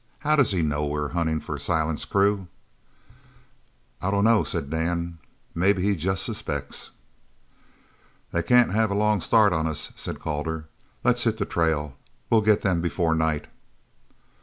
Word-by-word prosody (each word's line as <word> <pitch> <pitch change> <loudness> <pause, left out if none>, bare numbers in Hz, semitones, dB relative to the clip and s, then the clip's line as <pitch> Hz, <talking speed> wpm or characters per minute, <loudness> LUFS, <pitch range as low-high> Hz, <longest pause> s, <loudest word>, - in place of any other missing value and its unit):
How 150 0 +2
does 140 -6 +4
he 90 -4 +1
know 75 -1 0
we 75 +1 -2
are 75 -1 -2
hunting 80 0 0
for - - -6
Silent's 80 -2 -1
crew?" 100 -1 +1 1.5
"I 100 - -1
dunno," 105 +3 +3
said 70 - -4
Dan, 85 +1 -2 0.3
"maybe 95 +2 +2
he 100 0 +2
jest 95 +3 -1
suspects." 70 -1 -4 1.4
"They 85 - 0
can't 120 +7 +4
have 110 0 +2
a 100 - -1
long 105 -1 +2
start 105 -2 +4
of 80 -1 0
us," 80 -2 -3
said - - -6
Calder. 80 +1 -3 0.4
"Let's - - +2
hit - - +1
the - - -1
trail. 75 -4 -1 0.3
Well 115 -2 +5
get 105 0 +3
them 90 -4 +1
before 85 -1 0
night." 80 -2 0
85 Hz, 155 wpm, -25 LUFS, 80-100 Hz, 1.5 s, Well